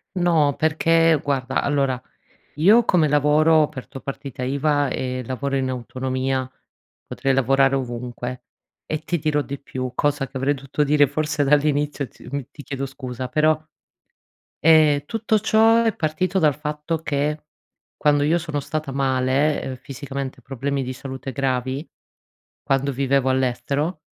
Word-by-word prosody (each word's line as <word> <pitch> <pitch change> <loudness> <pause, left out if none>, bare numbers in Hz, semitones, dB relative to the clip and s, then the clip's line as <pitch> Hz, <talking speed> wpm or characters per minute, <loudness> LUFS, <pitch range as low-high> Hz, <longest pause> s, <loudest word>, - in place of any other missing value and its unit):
No, 165 -5 +3
perché 165 +1 +3
guarda 135 -2 0
allora 135 -3 0 0.6
io 205 +10 +5
come 165 -6 +3
lavoro 150 +2 +4
ho 155 - +6
aperto 145 -2 -5
partita 135 -2 -6
iva 145 +2 +1
e 130 0 -3
lavoro 135 +2 -2
in 130 -1 0
autonomia, 130 +1 -2 0.6
potrei 135 -1 -1
lavorare 135 +1 +3
ovunque, 125 -1 -4 0.4
e 155 - -2
ti 175 +2 -1
dirò 150 0 +1
di 140 0 -6
più, 130 -2 -5
cosa 145 -2 0
che - - -12
avrei 135 +2 +1
dovuto 140 +2 -2
dire 145 0 +4
forse 150 +1 -1
dall'inizio 145 0 +1
ti - - -15
mhmm, 140 0 -2
ti 145 - -10
chiedo 140 -1 -4
scusa, 130 -2 -6
però, 155 +3 +2 1.0
ehm, 155 -2 +5
tutto 220 +1 0
ciò 225 +2 +4
è 225 - +1
partito 180 +4 0
dal 150 -4 +3
fatto 150 +2 -3
che, 150 0 -2 0.5
quando 145 -1 +2
io 160 +3 +3
sono 160 -3 -4
stata 155 0 -4
male, 135 +2 +1
ehm, 130 -1 -5
fisicamente, 135 0 -6
problemi 140 +1 -3
di 130 0 -4
salute 130 +1 -7
gravi 130 +2 -2 0.8
quando 135 +1 +1
vivevo 135 0 +1
all'estero, 140 +5 -1
140 Hz, 145 wpm, -22 LUFS, 130-155 Hz, 1.0 s, ho